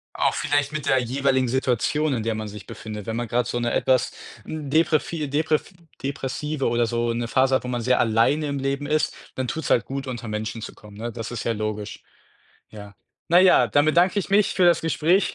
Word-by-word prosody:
Auch - - +1
vielleicht 145 0 0
mit 155 -2 -4
der 130 -1 +3
jeweiligen 130 +1 +1
Situation, 130 +4 0
in 115 - -1
der 110 0 -1
man 110 -1 -4
sich 105 0 -10
befindet. 110 -2 -8
Wenn 110 - -2
man 120 0 -2
grad 120 +2 0
so 120 - -2
'ne 120 0 -1
etwas 130 -1 +2 0.3
deprevi 155 0 0
deprv 155 +4 0 0.3
depressive 140 +1 -2
oder 120 0 +2
so 120 0 -1
'ne 120 0 -2
Phase 130 +2 +3
hat, - - 0
wo - - -6
man 120 -1 -2
sehr 125 +2 +2
alleine 115 +7 +2
im 140 -1 -2
Leben 140 +1 -2
ist, 150 0 0 0.2
dann 130 -1 -3
tut's 160 +4 -3
halt 120 - +3
gut, 135 0 -5
unter 120 -3 -6
Menschen 110 +1 -4
zu - - -8
kommen, 105 -1 -14
ne? 115 +1 -4
Das 115 +1 -6
ist 120 - -4
ja 115 - +1
logisch. 105 -1 -5 0.7
Ja. 100 -1 -11 0.4
Na 175 - +6
ja, 185 0 +6
dann 145 +1 +3
bedanke 175 +5 +3
ich - - -5
mich 200 +1 +3
für 185 - +3
das 175 - +4
Gespräch. 165 +4 +2
130 Hz, 215 wpm, -24 LUFS, 115-150 Hz, 0.7 s, Na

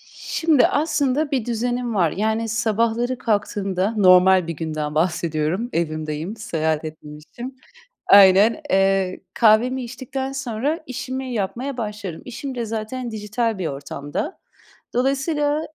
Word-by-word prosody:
Şimdi 320 -6 +2
aslında 290 -1 0
bir 260 -5 0
düzenim 240 0 -2
var. 170 -5 +2
Yani, 220 +4 -1
sabahları 230 +2 0
kalktığımda, 205 -3 -1
normal 185 -2 +6
bir 165 - -2
günden 155 -1 -4
bahsediyorum, 165 +4 0
evimdeyim, 155 +3 -2
seyahat 160 -7 -1
etmemişim. 155 - -9 0.5
Aynen. 200 +7 +7
Eee, 195 -1 +2
kahvemi 240 +3 +3
içtikten 265 +2 -5
sonra 270 +3 -2
işimi 260 0 -4
yapmaya 240 +6 -3
başlarım. 210 -6 -5
İşim 260 +2 -6
de 240 -2 -2
zaten 225 +3 -4
dijital 220 +1 -2
bir 175 - -1
ortamda. 145 - -5 0.6
Dolayısıyla, 290 +4 +1
220 Hz, 115 wpm, -22 LUFS, 185-255 Hz, 0.6 s, Aynen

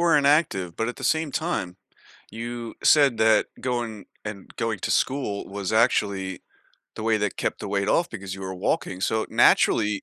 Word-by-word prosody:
were 170 -2 +4
inactive, 140 - +2
but 115 - -1
at 120 - -5
the - - -7
same 160 -1 +1
time, 140 - -2 0.5
you 115 0 -6
said 140 -6 +5
that 110 0 +4
going 120 -4 -3 0.2
and 105 -3 -8
going 115 -2 -1
to - - -2
school 130 -7 0
was, 100 +1 -4
actually 100 -4 +1 0.6
the - - -5
way 110 -1 +2
that 105 -1 -2
kept - - -2
the - - -5
weight 100 0 0
off 170 +8 +2
because 95 -4 -6
you 95 - -10
were 95 0 -5
walking, 95 0 -2
so, 110 +1 0
naturally, 105 -2 +3
110 Hz, 180 wpm, -25 LUFS, 100-120 Hz, 0.6 s, said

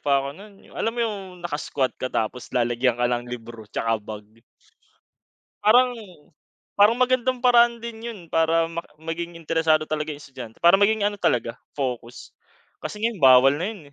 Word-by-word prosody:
pa 140 -1 +2
ako - - -4
nun, 200 -1 -15
yung - - -19
alam 225 - -2
mo - - -5
yung 210 -3 -3 0.3
naka-squat 145 -4 -2
ka 130 - -2
tapos 120 +1 -3
lalagyan 120 0 +1
ka 120 - 0
ng 120 0 -1
libro 115 -3 -9
tsaka 115 +1 -1
bag. 105 0 -8 1.4
Parang 245 +4 +5 0.8
parang 210 +3 +5
magandang 255 0 +2
paraan 240 -1 +4
din 230 -1 -8
yun, 215 - -9
para 165 0 +2 0.3
maging 170 +1 -5
interesado 160 -1 +1
talaga 155 0 -3
yung 145 - -6
estudyante 130 -5 -11
para 170 +2 +6
maging 205 +1 +3
ano, 205 - -1
talaga 120 - 0 0.2
focus 125 -4 -5 0.5
kasi 210 - -6
ngayon 220 -6 -2
bawal 130 +1 +7
na 170 +5 -2
yun, 210 -5 -10
160 Hz, 165 wpm, -24 LUFS, -, 1.4 s, bawal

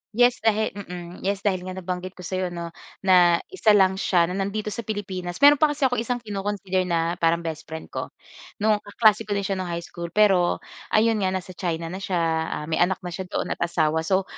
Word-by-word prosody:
Yes 245 +1 +4
dahil, 220 0 +1
mm. 180 -3 -8
Yes, 200 0 -2
dahil 185 -3 0
nga 185 - -5
nabanggit 185 0 -5
ko 180 - -11
sa'yo 185 +1 -2
'no, 170 -1 -6 0.3
na 175 -3 +5
isa 220 - +4
lang 190 -1 +4
siya 175 -3 +3
na 190 - -3
nandito 210 +2 -2
sa - - -6
Pilipinas. 185 -4 -4
Meron 290 0 +8
pa 310 - +6
kasi 295 -1 -3
akong 245 -3 +2
isang 240 +1 -2
kino-consider 195 -3 -2
na 170 0 0
parang 170 0 +2
best 160 -2 -5
friend 160 0 -8
ko. - - -4 0.6
Nung 215 -1 +3
kaklase 215 +1 +2
ko 205 - -1
din 200 - -1
siya 195 -1 -2
nung 185 - -3
high 170 0 -4
school, 170 0 -7
pero 195 -4 +3 0.3
ayon 220 0 +3
nga 190 - +1
nasa 185 0 -5
China 165 -2 -3
na 190 - -5
siya, 190 -1 -3 0.3
ah, - - -4
may - - +1
anak 180 +1 +1
na 180 - -5
siya 185 +1 -5
doon - - -3
at - - -3
asawa. 160 -2 +1
So, 190 +4 +1
190 Hz, 220 wpm, -24 LUFS, 175-210 Hz, 0.6 s, Meron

